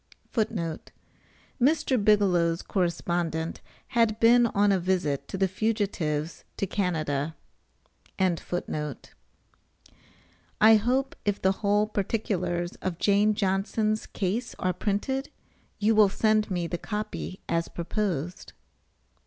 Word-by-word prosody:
[Footnote 185 -8 -2
A: - - -33 0.7
Mr. 280 -5 +2
Bigelow's 180 -5 +3
correspondent 170 -3 -1 0.3
had 230 -3 +2
been 235 +1 +6
on 205 -1 +2
a 195 - +3
visit 170 -7 -1
to - - -5
the 190 0 +2
fugitives 190 -7 -2
to - - 0
Canada.] 160 -6 -1 0.8
I 185 -3 +1 2.4
hope 255 +5 0
if 205 -1 0
the 190 - +3
whole 205 +1 +1
particulars 185 -5 -2
of 180 -3 -4
Jane 205 +2 +3
Johnson's 215 +2 0
case[B] 215 +5 -2
are 185 0 0
printed, 240 +9 -2 0.5
you 215 +2 +3
will 215 -2 +6
send 215 +1 +2
me 175 -3 -1
the 170 +1 -3
copy 210 -3 -5
as 165 0 0
proposed. 175 -2 -3
195 Hz, 110 wpm, -27 LUFS, 175-215 Hz, 2.4 s, been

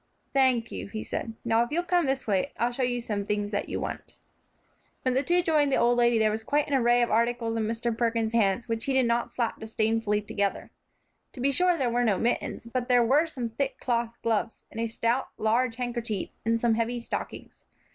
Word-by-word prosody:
"Thank 255 -4 +3
you," - - -5
he 215 +2 -5
said. 225 -1 -4
"Now, 225 0 +3
if 240 - -5
you'll 340 +4 0
come 350 -3 +1
this 270 0 -1
way, 205 +6 0
I'll 240 +1 +1
show 245 - -4
you 245 -1 +1
some 210 -4 -3
things 205 0 -2
that 200 - -2
you - - -2
want." - - -6 0.9
When 255 - +1
the 260 - +2
two 350 +5 +2
joined 300 -4 +2
the - - +3
old 240 +1 +3
lady 240 -1 +4
there 215 -1 +3
was 220 +1 -3
quite 290 +5 +1
a - - -11
little 265 -3 +3
array 240 +1 +4
of 235 - -1
articles 230 0 +1
in 220 -1 0
Mr. 230 +1 -1
Perkins's 230 -1 0
hands, 215 0 +2
which 225 -1 -2
he 275 - 0
did 260 -1 +3
not 235 0 +1
slap 235 -2 -2
disdainfully 220 -1 0
together. 200 -1 -2 0.6
To - - -11
be 275 +3 +2
sure 360 +4 +3
there 255 -5 0
were 245 +1 +1
no 210 -5 +2
mittens; 235 0 -1
but 245 +1 -3
there 245 -1 +5
were 290 +7 +3
some 250 -7 -4
thick 265 +4 -3
cloth 235 -2 -1
gloves, 225 0 -1
and 225 - -7
a 230 - 0
stout, 230 +3 0
large 230 +2 +1
handkerchief, 235 -4 -3 0.2
and 230 0 +2
some 235 -1 +2
heavy 230 +2 -1
stockings. 235 - -6
235 Hz, 225 wpm, -27 LUFS, 225-255 Hz, 0.9 s, there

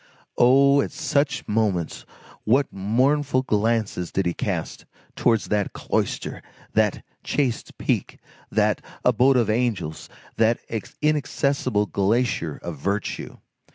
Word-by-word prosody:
Oh! 140 +3 +6
at - - -3
such 140 -1 0
moments, 105 -6 -1 0.4
what 130 +6 +2
mournful 130 +7 +1
glances 110 -5 0
did 95 - 0
he 85 - 0
cast - - -4 0.3
towards 115 -3 +1
that 105 -1 0
cloister, - - -2 0.3
that - - +1 0.2
chaste 130 -6 -1
peak, - - -1 0.3
that - - +1 0.2
abode 125 +2 +4
of 120 - +2
angels, 110 -10 -1 0.3
that 115 +1 +3 0.5
inaccessible 140 -6 +1
glacier 100 - 0
of 85 -4 -6
virtue! 100 +6 -3
115 Hz, 110 wpm, -24 LUFS, 100-135 Hz, 0.5 s, Oh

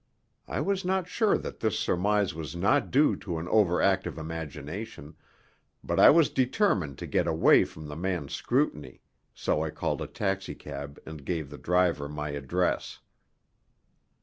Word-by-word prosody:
I - - -2
was 195 -1 0
not 185 -1 0
sure 215 +3 +2
that - - -7
this 110 -3 0
surmise 100 +1 +1
was 80 +1 -6
not 110 +11 +2
due 145 +3 +4
to 85 -5 -5
an 80 +2 -5
over 100 -5 +3
active 95 -4 +1
imagination, 80 +2 -7 0.7
but - - -1
I - - +9
was 165 -1 +5
determined 125 - +1
to - - -6
get - - 0
away 80 +1 +5
from 80 - -11
the 75 - -7
man's 85 -4 -3
scrutiny, 75 - -1 0.3
so 75 - 0
I 80 - -2
called - - -2
a - - -3
taxicab 75 -8 -4
and 80 -3 -9
gave 80 -2 -3
the 75 - -9
driver 90 -5 +1
my 75 0 -4
address. 70 +6 -1
90 Hz, 155 wpm, -28 LUFS, 75-105 Hz, 0.7 s, I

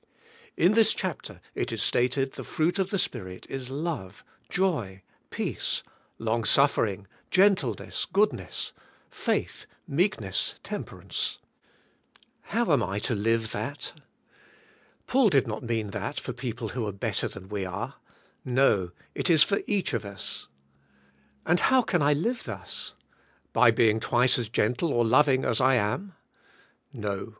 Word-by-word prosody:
In 180 +5 +5
this 225 0 +5
chapter - - -5
it - - -2
is - - -1
stated 130 +2 +1
the - - -7
fruit 175 +5 0
of 190 -1 +1
the 200 - 0
Spirit 95 - -4
is 130 -2 -5
love, 140 - -4 0.3
joy, 120 - -1 0.3
peace, - - -2 0.3
long" 115 +1 0
suffering", 110 -6 +3 0.2
gentleness, 185 - +2
goodness, - - 0 0.4
faith, - - -2 0.2
meekness, 140 - 0
temperance. - - -3 1.1
How - - +1
am - - +4
I 100 +2 -2
to 110 - -1
live 110 +1 +1
that? 120 +8 -4 1.1
Paul 255 -4 +4
did 135 -7 +3
not 110 -3 -4
mean 115 -4 -2
that - - -3
for - - -5
people 120 -3 -4
who 115 -1 -3
are - - -2
better 100 - -2
than 95 - -10
we 100 -1 -3
are. 95 +2 -4 0.5
No, 125 -8 +3 0.2
it - - -1
is 160 -3 +7
for 200 - +1
each 200 -4 0
of - - -1
us. 100 -1 -6 1.0
And 175 +1 +3
how 260 -1 +4
can 175 -6 +1
I 145 +1 +4
live 230 - -1
thus? 95 -6 -6 0.6
By - - +6
being 110 -1 +4
twice 125 +2 +3
as 115 -3 -3
gentle 125 +8 +1
or 120 0 +3
loving 130 +2 +4
as 115 - +1
I 130 +1 +5
am? 145 - -1 0.8
No! 100 0 -4
125 Hz, 140 wpm, -27 LUFS, 105-160 Hz, 1.1 s, is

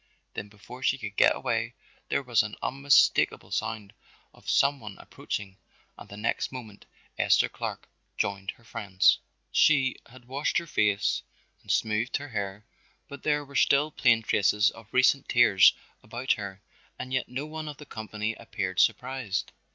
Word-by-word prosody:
Then 105 - -6
before 110 +5 -13
she 135 0 +2
could 105 -6 -7
get - - +5
away - - -2 0.3
there 140 - 0
was 120 -4 +3
an 105 0 -5
unmistakable 140 +1 +3
sound 110 -2 -3 0.4
of - - -11
some 140 0 +3
one 105 -4 -9
approaching 100 -1 -6 0.4
and - - -13
the 100 - -10
next 105 +2 -1
moment 110 -6 -10 0.3
Esther - - +4
Clark - - -6 0.3
joined 100 0 -2
her 120 - -7
friends. 95 -4 +2 0.3
She 135 -4 +3
had 125 0 -16
washed 135 +4 -1
her 170 - -1
face 105 -9 +1 0.4
and - - -19
smoothed 110 +3 +1
her 145 0 -8
hair, 100 -1 -4 0.4
but 140 -1 -10
there 145 -1 0
were 140 0 -14
still 145 +3 +3
plain 115 -5 +3
traces 105 +2 +3
of 115 -1 -15
recent 130 +2 +3
tears 110 -6 +6 0.3
about 120 +4 -3
her 100 -2 -3 0.3
and 130 - -6
yet 130 - -1
no 130 +4 -4
one 155 0 -6
of 150 -2 -7
the 150 - -11
company 110 -2 -4
appeared 95 -5 -4
surprised. 130 -6 0
115 Hz, 160 wpm, -27 LUFS, 105-135 Hz, 0.4 s, tears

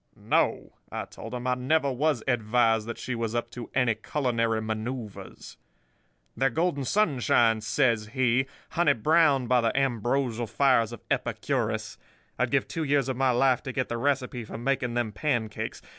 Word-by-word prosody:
No,' - - 0 0.2
I - - -4
told 115 +4 -9
him. 125 0 -5
'I 125 - +2
never 140 +3 +1
was 140 -1 0
advised 115 -2 +2
that 115 - -5
she 125 - -4
was 115 -1 -3
up 120 0 -2
to 120 -2 -8
any 125 -3 +3
culinary 115 -1 -1
manoeuvres.' 110 0 -6 0.8
"'They're 135 0 +2
golden 145 0 -1
sunshine,' 120 - +2
says 110 -1 +1
he, 130 +2 +1 0.2
'honey 175 +1 +3
browned 145 +1 +3
by 125 0 +3
the 115 +3 0
ambrosial 120 -2 0
fires 125 -2 +2
of 120 - -9
Epicurus. - - -2 0.4
I'd - - +1
give - - +1
two 165 - -3
years 140 -3 +1
of 130 - -2
my 135 0 +2
life 125 0 +3
to 130 - -5
get 130 0 -2
the 120 - -2
recipe 130 -3 -1
for 110 - -8
making 125 0 -1
them 120 -3 0
pancakes. 110 -2 -2
125 Hz, 165 wpm, -27 LUFS, 115-135 Hz, 0.8 s, any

